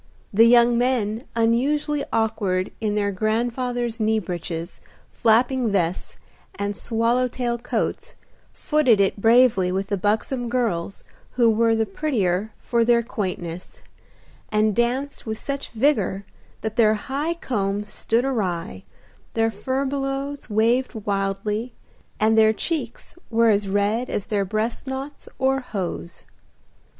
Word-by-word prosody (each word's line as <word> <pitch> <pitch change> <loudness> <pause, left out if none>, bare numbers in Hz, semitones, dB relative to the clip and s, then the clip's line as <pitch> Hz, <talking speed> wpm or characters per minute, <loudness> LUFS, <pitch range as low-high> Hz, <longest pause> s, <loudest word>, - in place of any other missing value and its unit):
The 225 +3 +7
young 235 0 +5
men, 235 -3 0
unusually 280 +6 +1
awkward 205 -5 0
in 210 -1 0
their 205 -1 +1
grandfathers' 235 +3 -1
knee 220 0 +2
breeches, 175 -3 -5 0.3
flapping 240 +1 +2
vests, 180 -3 -1 0.4
and 200 0 -3
swallow 235 +4 +1
tail 240 -1 -2
coats, 245 - -3 0.4
footed 285 -9 +2
it 200 +1 +1
bravely 225 -5 +5
with 195 +2 -2
the 200 - 0
buxom 225 +5 -1
girls 215 -8 -1 0.3
who 235 -2 +4
were 225 +1 +3
the 225 0 +1
prettier 205 - -1
for 235 -1 +1
their 235 0 +3
quaintness, 180 -6 -5 0.7
and 215 -1 +2
danced 250 +3 -1
with 220 0 -2
such 280 +3 -4
vigor 220 -6 +1 0.4
that 220 0 -4
their 220 -2 +5
high 285 +9 -2
combs 210 -8 -2
stood 235 +3 0
awry, 180 - -2 0.5
their 225 0 +2
furbelows 275 +4 -3
waved 230 +5 +2
wildly, 205 +3 -2 0.4
and 220 +1 +3
their 220 0 +5
cheeks 255 -2 -4
were 230 0 +4
as 200 -1 +1
red 205 +5 0
as 200 - -2
their 200 -2 0
breast 215 +6 -2
knots, 270 +2 -6
or 265 0 +2
hose. 185 -7 -5
225 Hz, 125 wpm, -23 LUFS, 205-250 Hz, 0.7 s, The